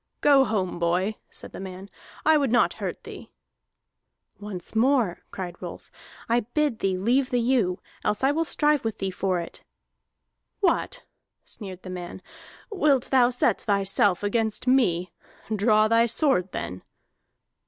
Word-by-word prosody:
"Go 280 -2 +5
home, 195 -6 -2
boy!" 180 +5 0
said - - -7
the - - -9
man. 190 0 -8 0.4
"I 315 +1 +6
would 280 -5 +1
not 245 - +3
hurt - - -4
thee." - - -10 1.1
"Once 205 -1 -6
more," 235 -6 +2
cried 175 -2 -7
Rolf, - - -9 0.4
"I 235 +1 +3
bid 245 +1 -1
thee 190 -1 0
leave 250 +7 +1
the 245 - +1
ewe, 230 -7 +1 0.3
else 210 +4 -1
will 285 +4 +2
I - - +3
strive 300 -2 +2
with 225 -2 -3
thee 190 -1 -3
for 185 -1 -1
it." 170 - -9 1.0
"What," 420 +6 0 0.4
sneered 190 -4 -8
the 185 - -7
man, 180 0 -7 0.5
"wilt 300 -10 +1
thou 250 -2 +5
set 250 0 +1
thyself 200 -2 +1
against 220 +2 0
me? 185 -10 +2 0.4
Draw 215 +1 +4
thy 230 +1 +4
sword, 230 - +1
then!" 90 0 -5
215 Hz, 145 wpm, -25 LUFS, 185-260 Hz, 1.1 s, I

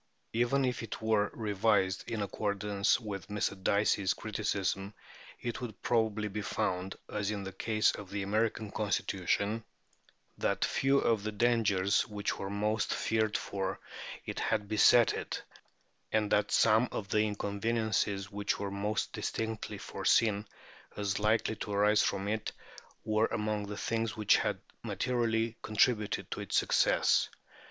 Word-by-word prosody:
Even 120 +4 +2
if 125 -1 -1
it 115 - -6
were 110 -2 +2
revised 100 -3 +1
in 110 -3 -1
accordance 100 +1 0
with 105 -4 -6
Mr. 100 -2 -2
Dicey's 100 -1 +2
criticism, 100 -2 -2 0.4
it 120 0 -4
would 115 -4 -6
probably 110 -3 +1
be 105 +1 -4
found, 95 -3 -2
as 105 -1 -2
in 105 -2 -3
the 95 - -5
case 110 +3 +2
of 100 -2 -8
the 100 0 -3
American 110 +1 0
Constitution, 100 +1 0 0.8
that - - +1
few 135 +1 +2
of 115 -5 +2
the 110 +1 -3
dangers 105 -3 +2
which 105 -1 -3
were 95 - -4
most 105 +2 0
feared 110 -1 +1
for 95 -1 -3 0.5
it - - -4
had 105 - 0
beset 110 +3 +6
it, - - -4 0.7
and 110 -1 +1
that 105 0 +3
some 115 +2 +4
of 100 - -4
the 105 - +3
inconveniences 105 -1 -1
which 100 0 -1
were 100 -1 -3
most 100 +2 -2
distinctly 110 -1 -3
foreseen 105 -2 +1 0.5
as 100 -1 -1
likely 110 +1 +2
to 105 - -5
arise 105 +1 +4
from 100 0 0
it 110 +1 -2 0.5
were 110 +1 +2
among 105 -1 -2
the 105 0 -5
things 115 0 -1
which 105 -1 +5
had - - -1 0.2
materially 115 -2 0
contributed 110 0 +1
to - - -3
its - - -1
success. - - +3
105 Hz, 145 wpm, -31 LUFS, 100-110 Hz, 0.8 s, beset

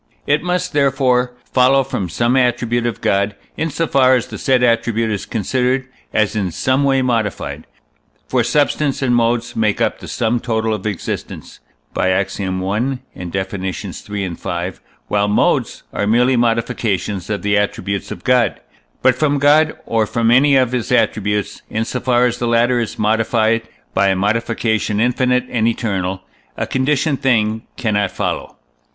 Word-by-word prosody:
It 145 +1 +2
must, 180 +1 -1
therefore, 130 -3 +2 0.2
follow 135 +1 +4
from 95 -8 -3
some 120 +8 +1
attribute 120 -2 +1
of 115 - -4
God, 100 +1 +1 0.2
in 160 - -1
so 160 +3 -1
far 130 -3 +4
as 125 - 0
the - - -8
said 130 -2 +2
attribute 115 -1 +1
is 100 - -3
considered 125 +4 0 0.2
as 110 0 +1
in 100 -4 0
some 130 - 0
way 135 -1 +2
modified; 115 -6 -2 0.6
for - - +1
substance 145 -1 +1
and 125 -2 +2
modes 115 0 0
make 110 -2 +1
up - - 0
the - - -10
sum 120 +1 0
total 110 -2 -1
of 105 -1 -3
existence 100 -5 -5 0.3
(by 95 - +1
Ax. 95 +1 0
i. 100 - -2
and 100 +8 -1 0.3
Def. 95 +1 -3
iii., 95 +1 -4
v.), 85 +1 -4 0.4
while 105 0 +1
modes 105 - +1
are 100 - -1
merely 125 +4 +3
modifications 115 -5 -1
of 105 -1 -2
the 105 0 +2
attributes 100 -1 -1
of - - -8
God. 125 -5 +2 0.4
But 130 0 +5
from 145 +3 +1
God, 150 +2 +4
or 110 -2 +1
from 115 +1 +1
any 140 +3 +5
of 130 -2 +3
his 125 0 -2
attributes, 105 -4 0
in 110 +1 -1
so 125 - -3
far 125 -1 +2
as 125 0 -1
the 120 - -1
latter 120 +1 +3
is 115 - -3
modified 110 +1 +1 0.3
by 100 - +3
a 95 - +3
modification 110 +1 0
infinite 125 +1 +2
and 115 -2 +1
eternal, 95 -5 -2 0.3
a - - -1
conditioned 135 +2 0
thing 110 -3 +1
cannot 105 -4 0
follow. - - -4
115 Hz, 165 wpm, -18 LUFS, 105-125 Hz, 0.6 s, But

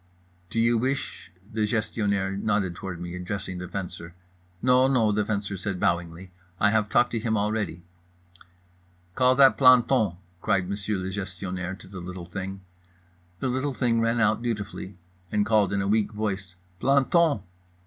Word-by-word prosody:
"Do 115 - -2
you 115 0 +3
wish?"—the 110 -5 -3
Gestionnaire 105 -3 0
nodded 100 -3 0
toward 90 -1 -6
me, 85 0 -6
addressing 90 0 -5
the 90 - -6
Fencer. 90 -2 -6 0.4
"No, 125 +3 +4
no" 120 -5 +3
the 105 0 +1
Fencer 100 -2 -2
said 95 0 -3
bowingly. 85 +1 -1 0.3
"I 105 - +4
have 110 -1 +1
talked 120 +2 +3
to 115 - -1
him 110 0 0
already." 105 -4 -2 1.3
"Call 130 +4 +4
that 135 0 +6
planton!" 125 -6 +5 0.3
cried 90 -1 +1
Monsieur 100 +1 -2
le 95 0 -4
Gestionnaire, 95 -1 -4
to 95 - -13
the 95 0 -8
little 90 0 -7
thing. 95 +2 -6 0.8
The 130 - 0
little 130 +2 -1
thing 115 -2 +1
ran 115 +1 +1
out 110 0 +2
dutifully 105 -5 -4 0.3
and 105 -1 +2
called 110 -2 +3
in 100 -1 0
a - - -2
weak 110 +1 +1
voice 100 -4 -3 0.3
"_Planton! 140 - +3
105 Hz, 155 wpm, -26 LUFS, 95-115 Hz, 1.3 s, that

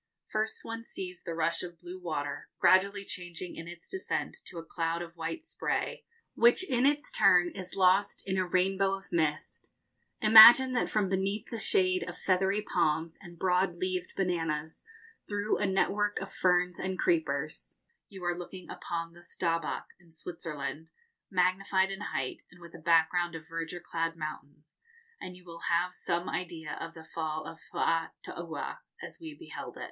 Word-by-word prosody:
First 215 +1 -2
one 230 0 -5
sees 180 -5 -6
the 170 -2 -5
rush 165 0 +1
of 175 -1 -7
blue 180 +2 -9
water, 145 -4 -4
gradually 200 +2 +4
changing 175 -1 -5
in 165 - -7
its 175 0 -9
descent 380 -1 -3
to 175 - -8
a 165 - -5
cloud 165 0 -2
of 170 0 -11
white 170 - -4
spray, 330 - -2 0.3
which 240 +11 +5
in 255 0 +3
its 290 0 +1
turn 175 -1 +5
is 185 -2 -7
lost 190 +2 +3
in 190 - 0
a 185 -1 +1
rainbow 195 +2 +2
of 195 0 -13
mist. 155 -3 -1 0.5
Imagine 225 +4 +10
that 245 - +1
from 210 -2 +1
beneath 195 +4 -1
the 230 - -3
shade 185 -3 +3
of 175 - -8
feathery 190 +2 +1
palms 160 -3 0
and 175 -2 -12
broad 180 0 +2
leaved 185 0 -3
bananas 160 -4 -2 0.5
through 205 +1 0
a 205 - +1
network 205 +2 +1
of - - -7
ferns 180 -1 +2
and 190 0 -2
creepers 340 -4 -1 0.3
you 190 -3 -10
are 175 0 +1
looking 180 +1 -8
upon 165 0 -4
the 175 - -15
Staubbach, 165 -1 -2
in 170 -2 -22
Switzerland, 160 -2 -5 0.4
magnified 190 +1 +2
in 195 +1 -5
height, 135 -10 -3
and 180 - -18
with 170 -1 -13
a 170 - -10
background 170 +1 +3
of 160 0 -9
verdure 165 +1 -4
clad 165 -1 -2
mountains, 155 -1 -8 0.4
and 180 0 -8
you 180 - -18
will 165 -1 -10
have 175 +2 +2
some 175 0 -2
idea 165 -2 -4
of 165 0 -6
the 160 - -10
fall 155 -1 -4
of 165 0 -9
Faataua 165 0 -2 0.2
as - - -8
we 320 -3 -8
beheld 335 +1 -8
it. - - -10
180 Hz, 170 wpm, -30 LUFS, 165-195 Hz, 0.5 s, Imagine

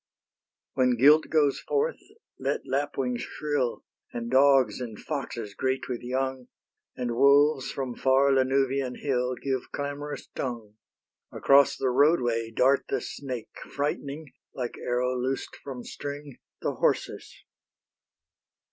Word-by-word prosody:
When 125 -2 +2
guilt 150 +6 +6
goes 150 -3 +2
forth, 455 +3 -1 0.4
let - - -2
lapwings 135 -3 -1
shrill, 145 -5 -2 0.3
And 120 0 -5
dogs 130 -4 +4
and 115 -4 -6
foxes 120 -8 -5
great 130 +4 -1
with 125 -2 -4
young, 130 +1 -2 0.5
And 125 -1 -2
wolves 140 +1 +4
from 130 -3 -4
far 135 +2 +3
Lanuvian 135 0 +1
hill, 125 -2 -1
Give 130 -1 -3
clamorous 145 +1 -5
tongue: 115 -5 -4 0.6
Across 140 0 +4
the 130 -2 0
roadway 125 -5 +2
dart 130 +4 +3
the - - 0
snake, 130 -5 -7
Frightening, 145 0 -3 0.2
like 125 -2 -4
arrow 125 +1 0
loosed 130 +2 -3
from 130 -3 -8
string, 145 -1 -7 0.2
The - - 0
horses. - - -1
130 Hz, 120 wpm, -27 LUFS, 125-140 Hz, 0.6 s, guilt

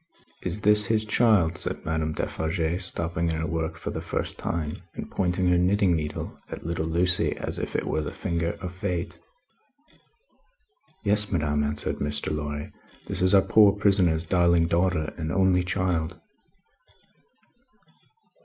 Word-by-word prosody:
"Is 105 - -2
that 105 +1 +5
his 110 +1 +1
child?" 105 -7 +3
said - - -2
Madame 80 -1 -1
Defarge, 80 +3 -2
stopping 85 -2 -2
in 80 - -1
her 80 0 -2
work 80 0 -3
for 85 - -5
the - - -4
first - - -3
time, 80 -3 -4
and - - -7
pointing 90 0 0
her 90 0 +4
knitting 95 0 +3
needle 75 -1 -5
at - - -8
little 85 -1 -2
Lucie 90 +2 +1
as - - -4
if - - -5
it - - 0
were 80 - -1
the 75 - -5
finger 85 0 -2
of 90 -2 -5
Fate. 90 -1 -4 1.8
"Yes, 105 0 +2
madame," 75 -4 0
answered 75 +1 -2
Mr. 75 +1 -2
Lorry; 75 0 -5 0.3
"this - - -1
is 95 +2 +5
our 95 - +6
poor 105 -3 +5
prisoner's 95 -6 +3
darling 85 -1 +3
daughter, 85 -2 0
and 80 0 -3
only 95 -2 +3
child." 90 -2 -1
85 Hz, 150 wpm, -26 LUFS, 80-95 Hz, 1.8 s, our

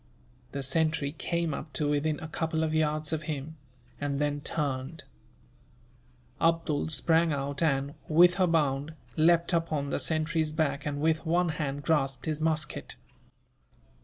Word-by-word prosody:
The 140 -1 -4
sentry 150 +1 +1
came 170 +1 -2
up 150 0 -7
to 145 +3 0
within 150 +1 0
a 160 - -5
couple 160 0 -1
of 155 -1 -1
yards 155 0 +1
of 155 - -1
him, 155 +2 -5 0.4
and 145 -1 -2
then 145 0 0
turned. 145 0 -3 1.4
Abdool 165 -2 +1
sprang 165 +2 +3
out 140 0 -3
and, 140 -3 +1
with 175 +4 +5
a 185 - +4
bound, 150 -2 0 0.2
leapt 170 +2 +3
upon 155 -4 0
the - - 0
sentry's 155 0 +1
back 150 -2 -1
and, 145 -1 -3
with 160 +1 +1
one 175 +1 +2
hand, 145 -3 -3
grasped 135 -5 0
his 155 -1 -2
musket. 155 -1 -1
155 Hz, 145 wpm, -29 LUFS, 145-160 Hz, 1.4 s, with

